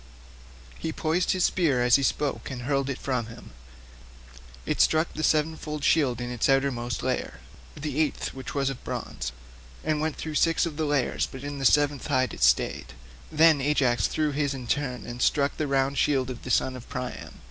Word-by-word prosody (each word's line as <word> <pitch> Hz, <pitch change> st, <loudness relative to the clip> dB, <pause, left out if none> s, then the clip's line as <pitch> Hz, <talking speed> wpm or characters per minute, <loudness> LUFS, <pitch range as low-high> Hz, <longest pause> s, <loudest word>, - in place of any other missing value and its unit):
He 160 Hz, -, -3 dB
poised 165 Hz, +3 st, 0 dB
his 185 Hz, -1 st, 0 dB
spear 145 Hz, -9 st, +2 dB
as 125 Hz, -1 st, +5 dB
he 140 Hz, -, +3 dB
spoke, 140 Hz, +1 st, -1 dB
and 125 Hz, -2 st, -6 dB
hurled 140 Hz, +1 st, 0 dB
it 135 Hz, -, -2 dB
from 125 Hz, -4 st, -2 dB
him. 115 Hz, -, -12 dB, 1.1 s
It -, -, +1 dB
struck 160 Hz, +1 st, +3 dB
the 155 Hz, -, -4 dB
sevenfold 155 Hz, -1 st, 0 dB
shield 135 Hz, -8 st, +3 dB
in 120 Hz, 0 st, -4 dB
its 120 Hz, +1 st, 0 dB
outermost 125 Hz, -4 st, 0 dB
layer—the 130 Hz, -, -5 dB
eighth, 155 Hz, -3 st, -1 dB
which 130 Hz, -1 st, -8 dB
was 135 Hz, -1 st, +1 dB
of 135 Hz, -, -9 dB
bronze—and 60 Hz, -, -5 dB
went 155 Hz, 0 st, -1 dB
through 155 Hz, -, -5 dB
six 165 Hz, -1 st, +3 dB
of 155 Hz, -3 st, -5 dB
the 160 Hz, -, 0 dB
layers 145 Hz, -3 st, 0 dB
but 135 Hz, 0 st, -9 dB
in 145 Hz, 0 st, -5 dB
the 135 Hz, -, -2 dB
seventh 145 Hz, +1 st, +3 dB
hide 130 Hz, -3 st, +1 dB
it -, -, -9 dB
stayed. -, -, +2 dB, 0.4 s
Then 155 Hz, -2 st, +5 dB
Ajax 130 Hz, -7 st, +2 dB
threw 155 Hz, -1 st, 0 dB
in -, -, -4 dB
his 145 Hz, -1 st, 0 dB
turn, 130 Hz, -4 st, -1 dB
and 120 Hz, +1 st, -7 dB
struck 140 Hz, +2 st, +2 dB
the 155 Hz, -, -1 dB
round 135 Hz, 0 st, +1 dB
shield 130 Hz, -3 st, +1 dB
of 125 Hz, -, -8 dB
the -, -, -8 dB
son 130 Hz, +2 st, +1 dB
of 125 Hz, -, -11 dB
Priam. 125 Hz, -1 st, -6 dB
135 Hz, 190 wpm, -26 LUFS, 125-150 Hz, 1.1 s, as